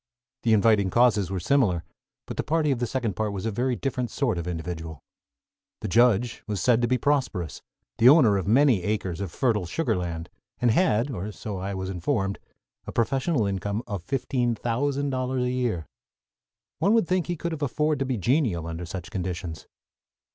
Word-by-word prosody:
The 115 - +3
inviting 105 -2 +4
causes 105 -4 +3
were 95 -1 -2
similar; 90 -5 +2 0.4
but - - -6
the - - 0
party 155 0 +1
of 130 - 0
the 120 - 0
second 115 -5 -2
part 110 -1 -1
was 100 +1 -4
a 115 - 0
very 125 +4 0
different 125 -2 -2
sort 120 -10 -1
of 85 - -5
individual. 80 -3 -5 0.8
The - - -3
judge 120 +2 +3
was 105 -3 -2
said 120 +5 +3
to 120 - +2
be 125 +2 +2
prosperous, 125 - -1 0.4
the 120 +2 +8
owner 130 -9 +6
of 95 -1 -1
many 125 -2 +4
acres 95 -2 -2
of 95 -4 -4
fertile 105 -7 0
sugar 160 - 0
land, 85 -2 -4 0.3
and 120 -2 +3
had, 140 - +2
or 105 -2 -4
so 105 -2 -6
I 100 +1 -3
was 95 0 -3
informed, 95 +2 -1 0.5
a - - -4
professional 130 +2 +1
income 100 +3 -2
of 100 -5 -4
fifteen 125 +1 -1
thousand 140 +5 -1
dollars 130 0 -1
a 125 - 0
year. 120 -10 -1 0.9
One 200 +8 +3
would 225 -7 +3
think 185 -2 0
he 175 - -1
could 170 +2 -3
have 160 -2 -5
afforded 150 +2 0
to 135 - 0
be 130 -2 -1
genial 110 - +1
under 85 +1 -5
such 85 -1 -7
conditions. 90 -3 -4
115 Hz, 190 wpm, -26 LUFS, 95-130 Hz, 0.9 s, the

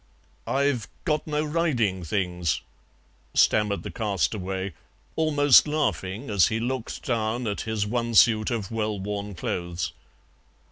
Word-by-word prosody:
"I've 135 -4 +1 0.2
got 155 -3 0
no 150 0 0
riding 130 - 0
things," 90 -4 -1 0.7
stammered 105 -2 +3
the - - -6
castaway, 95 - -2 0.4
almost 145 -3 +5
laughing 140 -7 -1
as 95 -5 +5
he 110 - -1
looked 125 0 -3
down 115 0 -1
at 105 -2 -2
his 110 -2 0
one 115 +1 -2
suit 110 -1 +5
of 115 -5 -3
well 110 -2 -1
worn 100 0 -4
clothes. 85 -2 -3
110 Hz, 125 wpm, -26 LUFS, 95-130 Hz, 0.7 s, almost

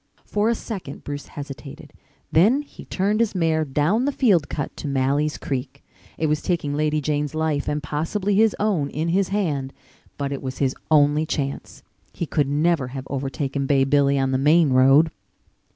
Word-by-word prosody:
For 210 +2 0
a 235 - +2
second 190 - -7
Bruce 145 0 -6
hesitated. 145 +1 -9 0.4
Then 225 - +4
he - - -13
turned 205 +3 0
his 230 -3 +1
mare 160 -3 +1
down 155 - +1
the 285 - +1
field 200 - +2
cut 145 - -4
to - - -5
Malley's 140 +2 0
Creek. 135 0 -5 0.3
It 160 - -1
was 150 0 +1
taking 165 -5 -1
Lady 150 +1 +1
Jane's 150 +1 -2
life 155 -2 -1
and 150 0 -2
possibly 165 +8 -1
his 220 +1 +4
own 190 -9 +1
in 160 +3 -2
his 190 +2 +2
hand, 150 -10 -1 0.5
but 140 -1 -3
it 140 - -4
was 130 -1 -5
his 135 -2 +1 0.2
only 150 0 +4
chance. 140 -3 -4 0.3
He 170 - -3
could 145 -2 0
never 150 -1 +1
have 130 +1 -7
overtaken 135 0 -2
Bay 135 -1 +3
Billy 140 0 +3
on 135 -1 +1
the 130 - +1
main 150 +1 +4
road. 135 +5 +5
150 Hz, 180 wpm, -23 LUFS, 140-170 Hz, 0.5 s, road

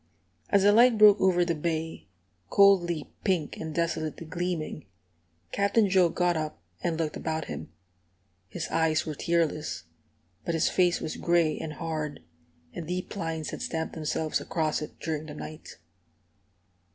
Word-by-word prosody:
As 200 -1 +4
the 205 - +7
light 235 +2 +6
broke 210 -1 +7
over 180 -2 +4
the 170 - +1
bay, 160 -2 -3 0.4
coldly 175 -6 +4
pink 180 -7 0
and 160 -1 -5
desolately 165 -1 -2
gleaming, 170 -2 -3 0.6
Captain 200 +2 +3
Joe 185 -2 +4
got 175 +1 +1
up 155 - -3 0.2
and 165 -2 -1
looked 160 -2 -2
about 160 -1 -2
him. - - -7 0.8
His - - -4
eyes 160 -1 +2
were 155 - -3
tearless, 160 - -1 0.6
but 170 - -1
his 160 - +2
face 180 -2 +2
was 155 - -4
gray 170 -2 +2
and 155 - -5
hard, 155 -2 -4 0.5
and 165 - -6
deep 180 +4 -4
lines 165 -4 -3
had - - -6
stamped 160 -1 -3
themselves 155 0 -1
across 155 -3 -1
it 150 - -8
during 155 -1 -3
the 150 - -8
night. 155 +1 -9
165 Hz, 150 wpm, -28 LUFS, 155-180 Hz, 0.8 s, the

